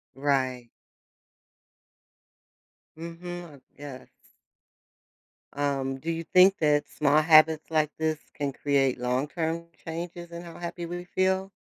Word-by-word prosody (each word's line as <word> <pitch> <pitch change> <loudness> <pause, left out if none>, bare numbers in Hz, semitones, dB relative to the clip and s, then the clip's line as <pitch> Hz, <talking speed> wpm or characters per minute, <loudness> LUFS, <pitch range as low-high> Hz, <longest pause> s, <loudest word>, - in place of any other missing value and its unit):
Right. 130 -3 0 2.3
Mhm. 175 +2 -7
Uh, - - -17 0.2
yes. 140 -3 -9 1.4
Um, 135 -2 -1
do 165 +4 -3
you 165 0 -3
think 185 +3 +5
that 150 -2 +2
small 150 0 +3
habits 155 0 +5
like 155 -1 +2
this 160 -1 0 0.2
can 140 -2 -2
create 135 -3 +1
long-term 155 +7 -1 0.2
changes 170 +1 -6
in 170 +1 -7
how 170 0 -10
happy 175 0 -5
we 175 +1 -6
feel? 190 +1 0
160 Hz, 115 wpm, -27 LUFS, 140-170 Hz, 2.3 s, think